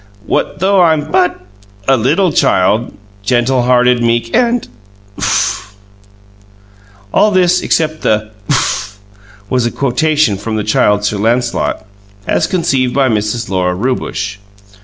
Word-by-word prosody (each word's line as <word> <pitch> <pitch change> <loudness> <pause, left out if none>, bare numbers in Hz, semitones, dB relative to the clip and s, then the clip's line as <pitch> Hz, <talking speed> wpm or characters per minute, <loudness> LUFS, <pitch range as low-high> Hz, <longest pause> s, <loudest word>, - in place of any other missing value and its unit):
What - - -1
though 190 +3 +2
I'm 155 -3 +2
BUT 180 -1 +1 0.5
a 135 - +5
littul 150 - +1
child, 100 +6 +2 0.3
Gentul 125 +2 +1
hearted, 125 -1 +3
meek, 115 0 0
and 240 -1 +1 0.3
' 100 0 -21
OOF!" 100 +1 -1 1.4
All - - +4
of 210 - -1
this 180 -1 +3
except 155 -1 -1
"oof" 105 -1 -1 0.5
was 125 +1 0
a - - -3
quotation 140 -3 +1
from 110 +3 -4
the 105 - -1
Child 105 -1 +1
Sir 105 0 -1
Lancelot, 120 +1 -1 0.4
as - - 0
conceived 135 -8 0
by 135 -2 +2
Mrs. 110 +1 -1
Lora 90 -2 -1
Rewbush. 105 -2 -3
120 Hz, 130 wpm, -14 LUFS, 105-155 Hz, 1.4 s, a